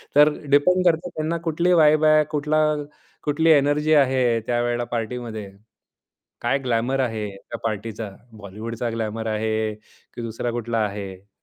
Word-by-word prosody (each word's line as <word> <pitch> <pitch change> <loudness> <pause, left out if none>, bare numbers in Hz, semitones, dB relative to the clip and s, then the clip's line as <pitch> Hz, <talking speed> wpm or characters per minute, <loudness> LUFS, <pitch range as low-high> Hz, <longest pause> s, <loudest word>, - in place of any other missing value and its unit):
तर 150 +1 +7 0.2
डिपेंड 180 +6 +4
करते, 175 +1 +2
त्यांना 160 +1 -2
कुठली 170 +3 +2
वाइब 155 -2 +5
आहे, 155 0 +6
कुठला 150 +1 0 0.7
कुठली 160 +3 +1
एनर्जी 150 +1 +3
आहे, 130 -5 +3
त्यावेळेला 120 0 0
पार्टीमध्ये. 115 -3 -4 0.9
काय 120 +4 +1
ग्लॅमर 125 +3 0
आहे 110 -4 -2
त्या 115 +3 -9
पार्टीचा? 110 -1 -4 0.2
बॉलिवूडचा 110 +3 -5
ग्लॅमर 110 0 -3
आहे, 110 0 -1 0.4
की 120 - -6
दुसरा 115 +1 -3
कुठला 115 -1 -2
आहे? 100 -1 -7
120 Hz, 130 wpm, -23 LUFS, 110-150 Hz, 0.9 s, तर